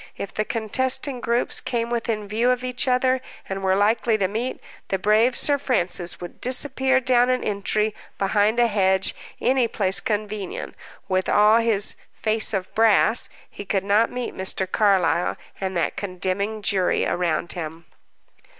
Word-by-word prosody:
If 200 Hz, -, -6 dB
the 215 Hz, -, -1 dB
contesting 255 Hz, +4 st, 0 dB
groups 235 Hz, +1 st, 0 dB
came 235 Hz, -1 st, -2 dB
within 225 Hz, -3 st, -2 dB
view 225 Hz, +4 st, +1 dB
of 250 Hz, 0 st, +1 dB
each 255 Hz, +2 st, -2 dB
other, 255 Hz, 0 st, +2 dB, 0.3 s
and 195 Hz, 0 st, -4 dB
were 190 Hz, 0 st, +2 dB
likely 220 Hz, +2 st, +2 dB
to 195 Hz, -3 st, +1 dB
meet, 230 Hz, +6 st, -3 dB, 0.3 s
the 195 Hz, -, 0 dB
brave 215 Hz, +5 st, +3 dB
Sir 285 Hz, -1 st, +2 dB
Francis 180 Hz, -9 st, -1 dB
would 175 Hz, -1 st, -10 dB
disappear 265 Hz, +1 st, +2 dB
down 250 Hz, -1 st, +3 dB
an 255 Hz, 0 st, +1 dB
entry, 210 Hz, +1 st, -1 dB, 0.2 s
behind 205 Hz, +3 st, +2 dB
a 240 Hz, -, +5 dB
hedge, 190 Hz, -4 st, +2 dB, 0.3 s
any 255 Hz, -1 st, +2 dB
place 195 Hz, -4 st, +1 dB
convenient; 210 Hz, -2 st, -4 dB, 0.3 s
with 185 Hz, -1 st, 0 dB
all 210 Hz, +2 st, +5 dB
his 220 Hz, -3 st, 0 dB, 0.2 s
"face 220 Hz, 0 st, -1 dB
of 190 Hz, -3 st, -3 dB
brass," 225 Hz, +1 st, +3 dB, 0.2 s
he -, -, -9 dB
could 195 Hz, -1 st, -1 dB
not 210 Hz, +3 st, +3 dB
meet 250 Hz, -1 st, -4 dB
Mr. 190 Hz, 0 st, -2 dB
Carlyle 185 Hz, -3 st, +2 dB, 0.2 s
and 190 Hz, -2 st, -2 dB
that 170 Hz, -, -1 dB
condemning 200 Hz, +2 st, -3 dB
jury 195 Hz, -3 st, +1 dB
around 175 Hz, -1 st, -1 dB
him. 165 Hz, -1 st, -7 dB
215 Hz, 155 wpm, -23 LUFS, 195-240 Hz, 0.3 s, a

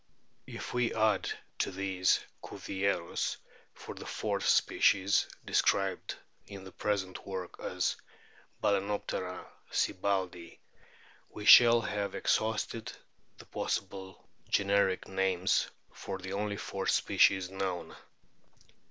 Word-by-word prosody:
If -, -, -7 dB
we 125 Hz, -1 st, 0 dB
add 110 Hz, -3 st, +2 dB, 0.3 s
to -, -, +1 dB
these 95 Hz, -1 st, +1 dB, 0.2 s
Cuvieriiis 95 Hz, -3 st, -2 dB, 0.4 s
for -, -, -8 dB
the -, -, -9 dB
fourth -, -, -2 dB
species, 100 Hz, 0 st, +3 dB, 0.2 s
described 95 Hz, -1 st, +1 dB, 0.3 s
in 100 Hz, -1 st, -9 dB
the 95 Hz, -, -10 dB
present 95 Hz, -3 st, -3 dB
work 95 Hz, -2 st, -6 dB
as -, -, -1 dB, 0.7 s
Balcen 100 Hz, -1 st, +2 dB
optera 95 Hz, -3 st, -3 dB, 0.3 s
sibbaldii, 95 Hz, -3 st, -1 dB, 0.7 s
we 105 Hz, -, -8 dB
shall 120 Hz, +1 st, +9 dB
have 100 Hz, -2 st, -3 dB
exhausted 110 Hz, +1 st, -1 dB, 0.5 s
the -, -, -13 dB
possible 95 Hz, -1 st, -4 dB, 0.2 s
generic 100 Hz, -1 st, +2 dB
names 95 Hz, -1 st, +1 dB, 0.2 s
for 95 Hz, -, -6 dB
the 95 Hz, 0 st, -7 dB
only 100 Hz, 0 st, -2 dB
four 95 Hz, -1 st, -4 dB
species 95 Hz, -2 st, +3 dB
known. 95 Hz, -2 st, -4 dB
95 Hz, 105 wpm, -31 LUFS, 95-100 Hz, 0.7 s, shall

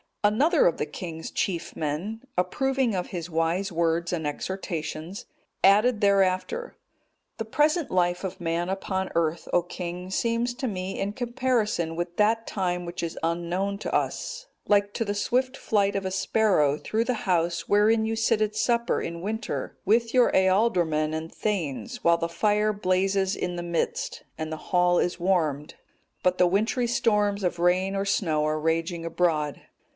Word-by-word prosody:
Another 275 Hz, -, +4 dB
of 170 Hz, -, +1 dB
the -, -, -1 dB
king's 160 Hz, +1 st, -6 dB
chief 175 Hz, -4 st, -2 dB
men, 165 Hz, +9 st, -3 dB, 0.2 s
approving 260 Hz, +6 st, +1 dB
of 180 Hz, -1 st, -2 dB
his 175 Hz, -3 st, -5 dB
wise 170 Hz, +4 st, 0 dB
words 170 Hz, 0 st, 0 dB
and 160 Hz, -3 st, -2 dB
exhortations, 165 Hz, +1 st, -5 dB, 0.4 s
added 210 Hz, +4 st, +5 dB
thereafter: 200 Hz, -, +1 dB, 0.6 s
"The 225 Hz, -, -3 dB
present 300 Hz, +7 st, +1 dB
life 175 Hz, 0 st, +1 dB
of 190 Hz, -1 st, -5 dB
man 170 Hz, +1 st, -1 dB
upon 190 Hz, 0 st, -2 dB
earth, 165 Hz, 0 st, 0 dB
O 175 Hz, -, +4 dB
king, 180 Hz, +1 st, -6 dB
seems 235 Hz, +3 st, 0 dB
to 260 Hz, -, -3 dB
me, 190 Hz, -3 st, -4 dB
in 200 Hz, +1 st, -2 dB
comparison 235 Hz, -8 st, -1 dB
with 175 Hz, +1 st, -4 dB
that 225 Hz, +2 st, +2 dB
time 180 Hz, -3 st, -2 dB
which 170 Hz, +1 st, -5 dB
is 170 Hz, -1 st, -4 dB
unknown 175 Hz, +4 st, -1 dB
to -, -, -4 dB
us, -, -, -2 dB, 0.2 s
like 205 Hz, -1 st, +3 dB
to 230 Hz, -, -1 dB
the 205 Hz, 0 st, -2 dB
swift 255 Hz, +5 st, 0 dB
flight 200 Hz, -2 st, +1 dB
of 195 Hz, -1 st, -2 dB
a 190 Hz, -, -2 dB
sparrow 190 Hz, -6 st, +2 dB
through 220 Hz, +8 st, -1 dB
the 250 Hz, -, +1 dB
house 170 Hz, -2 st, 0 dB
wherein 220 Hz, +2 st, +4 dB
you 225 Hz, 0 st, -1 dB
sit 225 Hz, 0 st, +1 dB
at 215 Hz, 0 st, 0 dB
supper 235 Hz, +2 st, +1 dB
in 170 Hz, 0 st, -5 dB
winter, 220 Hz, +3 st, -4 dB
with 230 Hz, +3 st, +2 dB
your 250 Hz, -2 st, +5 dB
ealdormen 185 Hz, -6 st, +2 dB
and 160 Hz, +1 st, -5 dB
thegns, 150 Hz, -, -3 dB
while 170 Hz, 0 st, +5 dB
the 170 Hz, 0 st, -2 dB
fire 210 Hz, +4 st, +1 dB
blazes 190 Hz, 0 st, +1 dB
in 180 Hz, 0 st, -3 dB
the 175 Hz, -, -4 dB
midst, 470 Hz, -, -2 dB
and 160 Hz, 0 st, -4 dB
the 155 Hz, -, -3 dB
hall 180 Hz, -1 st, +3 dB
is 175 Hz, -, -1 dB
warmed, 160 Hz, -5 st, 0 dB, 0.5 s
but 180 Hz, 0 st, +2 dB
the 180 Hz, -, +6 dB
wintry 220 Hz, +6 st, +1 dB
storms 210 Hz, -4 st, +1 dB
of 180 Hz, -1 st, 0 dB
rain 185 Hz, +3 st, +2 dB
or 195 Hz, 0 st, -1 dB
snow 160 Hz, -6 st, +1 dB
are 155 Hz, 0 st, 0 dB
raging 165 Hz, +2 st, -1 dB
abroad. 160 Hz, -3 st, 0 dB
190 Hz, 165 wpm, -26 LUFS, 170-215 Hz, 0.6 s, the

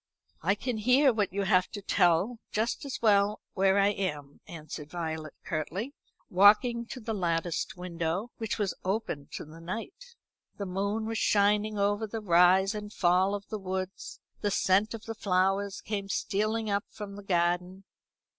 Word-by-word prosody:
"I 195 Hz, +4 st, +2 dB
can 240 Hz, +2 st, -3 dB
hear 255 Hz, +4 st, +5 dB
what 210 Hz, -3 st, 0 dB
you 200 Hz, +1 st, -1 dB
have 185 Hz, -2 st, +3 dB
to 205 Hz, -, -4 dB
tell 185 Hz, +6 st, +2 dB
just 230 Hz, +8 st, -1 dB
as 275 Hz, -, -4 dB
well 205 Hz, -1 st, +4 dB
where 195 Hz, 0 st, +3 dB
I 200 Hz, 0 st, +5 dB
am," 150 Hz, -8 st, -4 dB
answered 155 Hz, -2 st, -8 dB
Violet 160 Hz, -3 st, -5 dB
curtly, 180 Hz, -, -3 dB, 0.3 s
walking 220 Hz, +5 st, +5 dB
to 255 Hz, -, -7 dB
the 225 Hz, -1 st, -4 dB
latticed 170 Hz, -3 st, -1 dB
window, 180 Hz, +4 st, -3 dB
which 225 Hz, -1 st, -2 dB
was 205 Hz, -3 st, 0 dB
open 185 Hz, -7 st, -2 dB
to -, -, -5 dB
the 160 Hz, +2 st, -13 dB
night. 290 Hz, -, -7 dB, 0.4 s
The 200 Hz, -, -3 dB
moon 200 Hz, +4 st, -2 dB
was 225 Hz, 0 st, -2 dB
shining 210 Hz, +1 st, +2 dB
over 205 Hz, +2 st, +1 dB
the 225 Hz, +2 st, -4 dB
rise 185 Hz, +1 st, +4 dB
and 210 Hz, -1 st, -6 dB
fall 185 Hz, +1 st, +2 dB
of 200 Hz, 0 st, -7 dB
the 215 Hz, -, -4 dB
woods; 190 Hz, 0 st, -5 dB, 0.2 s
the 205 Hz, -, 0 dB
scent 200 Hz, +3 st, +2 dB
of 220 Hz, -, -10 dB
the 225 Hz, -, -4 dB
flowers 195 Hz, -1 st, 0 dB
came 200 Hz, -2 st, -4 dB
stealing 215 Hz, +3 st, -1 dB
up 200 Hz, 0 st, 0 dB
from 205 Hz, -2 st, -8 dB
the 205 Hz, -, -8 dB
garden. 180 Hz, +1 st, 0 dB
200 Hz, 165 wpm, -29 LUFS, 180-215 Hz, 0.4 s, hear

